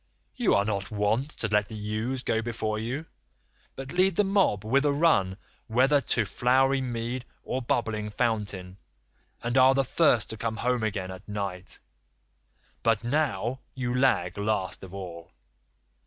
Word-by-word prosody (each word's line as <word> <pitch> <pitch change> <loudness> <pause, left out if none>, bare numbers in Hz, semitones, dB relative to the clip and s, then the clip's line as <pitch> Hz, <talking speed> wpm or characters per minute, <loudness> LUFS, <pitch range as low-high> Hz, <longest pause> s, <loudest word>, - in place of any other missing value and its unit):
You 245 -5 +3
are 100 - +3
not 100 -2 -2
wont 110 +6 0
to 110 - -1
let 105 0 +2
the 110 - -8
ewes 110 +5 -3
go 110 - +1
before 110 -2 -2
you, 125 +8 -3 0.7
but 135 0 -7
lead 185 0 +3
the 210 - +4
mob 195 - +2
with 135 +6 +3
a 145 - +3
run 140 - +3 0.3
whether 135 +5 +4
to 115 -4 0
flowery 130 +5 +2
mead 120 0 -3 0.2
or 130 - -2
bubbling 110 -3 -1
fountain, 105 -5 -2 0.7
and 120 +1 -1
are 130 +1 +6
the 135 0 +2
first 125 - +3
to 110 - -5
come 110 0 -2
home 125 0 0
again 100 -4 -2
at 95 +2 -10
night; 100 -3 -4 1.0
but 115 -1 +2
now 125 -3 0 0.2
you 125 -2 -2
lag 100 -9 +2
last 100 -2 -1
of 95 - -10
all. 90 -5 -8
115 Hz, 155 wpm, -27 LUFS, 105-130 Hz, 1.0 s, are